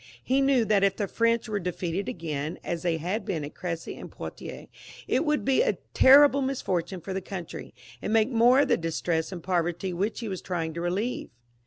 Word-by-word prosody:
He 265 +2 +2
knew 270 -4 +3
that 210 -2 +3
if 195 -1 +3
the 205 - -2
French 230 +3 +1
were 210 -2 -1
defeated 180 +1 -3
again, 155 -2 -4
as 170 -1 -3
they 170 -2 0
had 180 +8 -2
been 170 -8 -3
at 145 - -9
Cressy 165 -2 -5
and - - -9
Poitiers, - - -8 0.4
it - - +1
would 300 -1 +1
be 270 -1 +3
a - - +1 0.2
terrible 280 +1 +7
misfortune 190 -9 -2
for 190 +4 -5
the 190 - -2
country, 180 -3 -7 0.3
and - - -3
make 225 +3 +3
more 245 +3 +5
of 285 - +2
the 240 - +4
distress 165 0 -1
and 175 -3 -7
poverty 175 0 -1
which 200 +5 -2
he 230 - -4
was 190 -3 -4
trying 165 -3 -3
to 170 - -4
relieve. 195 +8 -2
190 Hz, 205 wpm, -27 LUFS, 170-230 Hz, 0.4 s, terrible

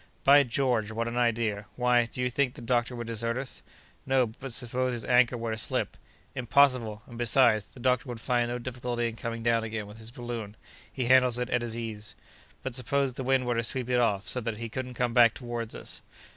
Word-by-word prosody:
"By 145 +1 +8
George, 120 -4 0
what 115 +1 -2
an 115 - -4
idea! 115 -4 0
Why, 125 -1 +3
do 125 - -6
you 125 0 0
think 130 0 0
the - - -10
doctor 120 +1 0
would 120 0 -5
desert 115 +1 -2
us?" 130 -1 -5 0.4
"No; 130 -1 +3
but 125 +4 -8
suppose 125 +1 0
his 115 -3 -4
anchor 125 0 +4
were 115 -1 -3
to 110 - -3
slip!" - - -1 0.4
"Impossible! 125 -4 +2
and, 120 -1 -11
besides, 115 -3 +4
the - - -16
doctor 125 +1 +1
would 120 -2 -5
find 120 0 +1
no 120 - -2
difficulty 120 -1 -3
in 115 - -5
coming 115 0 -5
down 115 -1 +2
again 110 -1 -4
with 105 +2 -12
his 110 0 -7
balloon; 120 -3 -6 0.3
he 130 - -2
handles 125 -1 +5
it 125 +1 -3
at 120 - +2
his 115 -1 -3
ease." 110 -2 -6 0.5
"But 130 - -4
suppose 135 +1 0
the 130 - -5
wind 130 0 +2
were 120 - +1
to 115 0 0
sweep 125 +1 -1
it 125 - +3
off, 105 -4 +1
so 125 - -2
that 115 -2 -3
he 115 +1 -5
couldn't 125 +1 -5
come 120 -1 0
back 120 -2 +6
toward 120 -2 -5
us?" - - -5
120 Hz, 225 wpm, -28 LUFS, 115-125 Hz, 0.5 s, By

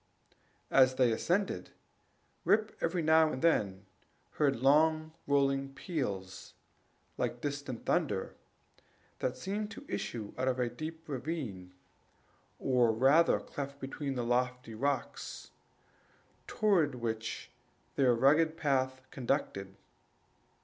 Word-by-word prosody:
As 130 -1 +5
they 125 -2 +4
ascended, 185 - 0 0.7
Rip 215 +1 +2
every 165 0 0
now 160 0 +5
and 130 - -5
then 100 - +2 0.5
heard 140 -3 +2
long 155 +5 +3 0.2
rolling 135 -1 +1
peals 100 - -4 0.6
like 120 - -1
distant 140 -4 -4
thunder, - - 0 0.9
that 130 0 -1
seemed 205 +9 -3
to 280 - -10
issue 110 -4 -4
out 130 - 0
of 130 -1 +1
a 125 -1 +1
deep 160 +5 -7
ravine, 125 - -5 0.8
or 125 -3 +3
rather 135 +9 +4
cleft, 140 0 -6
between 135 0 -4
lofty 125 0 -1
rocks, 130 +2 -3 1.0
toward 175 -10 +2
which 115 -2 -4 0.4
their 125 -3 +4
rugged 155 +6 +4
path 130 -3 0
conducted. 120 -7 -2
135 Hz, 105 wpm, -32 LUFS, 120-155 Hz, 1.0 s, As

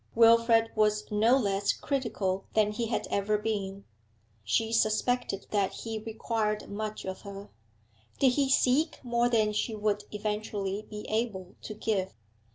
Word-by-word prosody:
Wilfrid 230 0 +5
was 210 -1 +2
no 225 +5 +4
less 200 -4 +1
critical 215 -8 -2
than 210 -1 +3
he 230 +2 -2
had 225 - -1
ever 205 +1 +1
been; 200 -2 -3 0.6
she 220 - 0
suspected 225 -1 +1
that 200 -2 +1
he 225 -1 -5
required 220 -1 -2
much 215 +1 -4
of 190 0 -5
her. 200 0 -9 0.7
Did 270 - +5
he 275 +1 +1
seek 270 +4 +3
more 240 -1 +1
than 215 -3 +2
she 215 +1 -1
would 210 -1 -1
eventually 210 -1 -3
be 210 -1 -7
able 210 -5 -2
to 215 - -7
give? 195 -4 -1
215 Hz, 145 wpm, -29 LUFS, 205-230 Hz, 0.7 s, Wilfrid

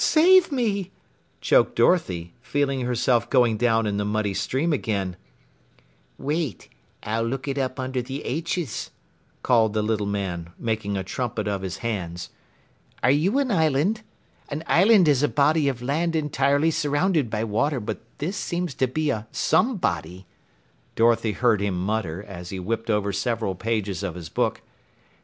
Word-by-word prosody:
Save 355 +2 +5
me!" 210 -8 0 0.5
choked - - +3
Dorothy, 90 - +2
feeling 140 0 -1
herself 120 -1 +1
going 120 -4 +4
down 115 0 +2
in 100 -1 -1
the 105 - 0
muddy 105 -1 -1
stream 145 - 0
again. 100 -8 -2 1.0
"Wait! 150 -3 -3 0.3
I'll 115 +2 -1
look 130 +4 -3
it 140 0 -1
up 130 0 -2
under 130 0 -2
the 135 +4 -6
'H's," 165 -1 -3 0.5
called 110 -4 +3
the 110 -1 0
little 105 -1 0
man, 90 -4 -3
making 110 -3 -2
a 95 - -2
trumpet 110 +1 -3
of 100 -2 -1
his 95 -1 -4
hands. 90 -6 -4 0.7
"Are 130 - +5
you 170 - +2
an 275 -3 +1
island? 160 - +2 0.5
An 150 +2 -4
island 190 +1 +5
is 140 -3 +4
a 150 - +3
body 150 +1 +2
of 125 -3 -2
land 165 +6 0
entirely 145 0 +2
surrounded 150 - +1
by 110 0 -1
water, 125 +6 0
but 110 -1 -5 0.2
this 170 +7 -3
seems 175 -5 -2
to 130 - +1
be 150 +3 0
a 110 -3 -4
some 245 -2 +2
body," 85 - -3 0.7
Dorothy 115 -1 +3
heard 115 -4 +2
him 100 -3 -1
mutter 95 -2 -2
as 90 -3 -8
he 95 -1 -5
whipped 115 +5 -3
over 105 -2 +1
several 105 0 -1
pages 100 -1 -2
of 95 -4 -4
his 85 -3 -8
book. - - -1
120 Hz, 160 wpm, -24 LUFS, 105-150 Hz, 1.0 s, Save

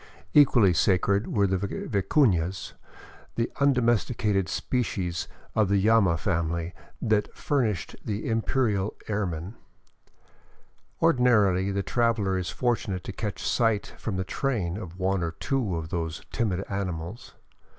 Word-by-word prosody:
Equally 120 -10 +6
sacred 100 +4 +2
were 100 -3 +2
the 95 -1 0
vicunas, 95 - 0 0.6
the 115 - -1
undomesti 125 -4 +2
cated 100 -6 0
species 95 -9 -2 0.3
of 110 -3 +2
the 100 0 +3
llama 100 -4 +4
family 85 0 -1 0.3
that 110 -3 +1
furnished 120 - -1
the 105 -1 -3
imperial 110 -3 0
ermine. 95 -3 -2 1.5
Ordinarily 110 - +4
the 100 0 -1
traveler 115 -5 +1
is 90 -1 -2
fortunate 110 -7 -1
to - - -5
catch 105 -3 -4
sight 115 -3 +1
from 105 - -3
the 95 - -1
train 100 -4 -2
of 90 -4 -7
one 95 0 0
or 85 -1 -2
two 120 -3 -1
of 80 -1 -4
those 80 -2 -3
timid 100 -5 -1
animals. 95 0 -5
100 Hz, 125 wpm, -27 LUFS, 90-115 Hz, 1.5 s, Equally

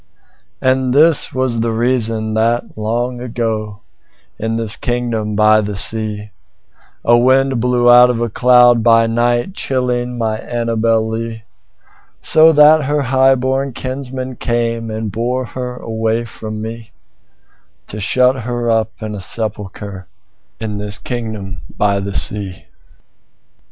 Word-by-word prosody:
And 130 0 +1
this 155 +1 +4
was 130 -3 -1
the 115 0 0
reason 115 -2 0
that, 115 +2 0
long 120 +3 -2
ago, 110 -4 -3 0.6
In 110 +1 -2
this 115 -1 0
kingdom 115 -4 -2
by 110 +1 +4
the 105 -1 -4
sea,A 105 - -3
wind 130 +1 +3
blew 125 0 +1
out 125 +1 +7
of 120 -2 -1
a 120 - 0
cloud, 120 0 +4
chillingMy 120 - +2 0.8
beautiful - - -12
Annabel 115 -1 +1
Lee; 110 0 -5 0.8
So 160 +1 +6
that 150 0 +5
her 145 +1 0
highborn 130 +1 +1
kinsmen 130 0 -6
cameAnd 115 -2 -2
bore 125 +4 -2
her 125 +1 -6
away 115 0 -2
from 110 0 -7
me, 115 0 -7 1.0
To 105 - -8
shut 125 +5 +2
her 120 0 -2
up 110 -1 +1
in 110 -1 -4
a 105 - -6
sepulchreIn 100 -2 -3 0.7
this 105 +1 -2
kingdom 110 -7 -6 0.2
by 100 -1 +1
the 100 0 -5
sea. 100 -3 -3
115 Hz, 120 wpm, -16 LUFS, 110-125 Hz, 1.0 s, out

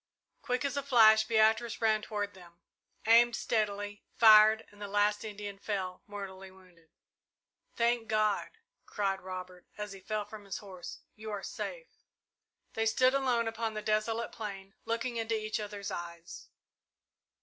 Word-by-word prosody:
Quick 250 +2 -1
as 280 - -1
a 280 - 0
flash 220 -5 +6
Beatrice 220 +1 +2
ran 220 -1 +2
toward 205 -2 -3
them, 175 -2 -16 0.5
aimed 235 +1 +6
steadily, 205 -2 -2
fired, 220 -1 +7
and 205 0 -18
the 205 - -4
last 205 +1 +1
Indian 205 -2 -7
fell, 190 -3 -3
mortally 195 -2 -8
wounded. 180 -3 -21 0.9
"Thank 235 -1 +1
God!" 215 -1 +1 0.4
cried 195 -2 -1
Robert, 185 -1 -8
as 210 -1 -5
he 195 - -9
fell 210 +2 -3
from 210 0 -11
his 195 - -5
horse. 185 -4 -9
"You 220 0 -8
are 205 -2 -4
safe!" - - -7 0.7
They 225 0 0
stood 255 +3 +4
alone 250 -4 +1
upon 225 -1 -3
the 215 - -4
desolate 220 +2 0
plain, 195 -3 -7
looking 230 +1 -2
into 225 -1 -1
each 215 0 -3
other's 205 -1 -5
eyes. 170 -1 -8
215 Hz, 150 wpm, -31 LUFS, 195-225 Hz, 0.9 s, fired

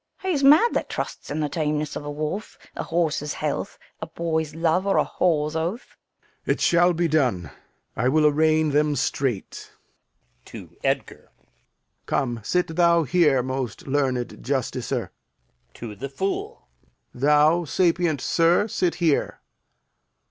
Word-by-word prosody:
Fool. 380 -1 -3
He's 285 -5 0
mad 305 +12 +6
that - - -2
trusts - - -5
in 150 +2 -2
the 150 - 0
tameness 150 0 -2
of - - -5
a 145 - -6
wolf, 155 +8 -4 0.2
a - - -4
horse's 160 -3 -1
health, 150 -2 -3 0.2
a 160 - -4
boy's 160 -2 -3
love, 165 +4 +1
or 195 - +2
a - - +3
whore's 155 -3 0
oath. 170 +9 -4 0.5
Lear. - - +3
It - - -14
shall 175 +1 +4
be 170 0 0
done; 125 - 0 0.4
I 125 +4 +1
will 155 +2 +3
arraign 155 +1 +3
them 150 +1 +2
straight. 130 -4 -3 0.7
[To - - -11
Edgar] - - -2 0.8
Come, 120 -3 -1
sit 170 - -1
thou 170 -1 +4
here, 150 -5 +3
most 130 -2 -4
learned 135 -3 -1
justicer. 125 -1 -2 0.6
[To 115 -3 -7
the 135 +7 -7
Fool] 190 - -4 0.5
Thou, 150 +5 +3
sapient 170 -3 +1
sir, 170 +5 +2
sit 180 -4 -1
here. 165 -5 0
155 Hz, 140 wpm, -24 LUFS, 140-170 Hz, 0.8 s, mad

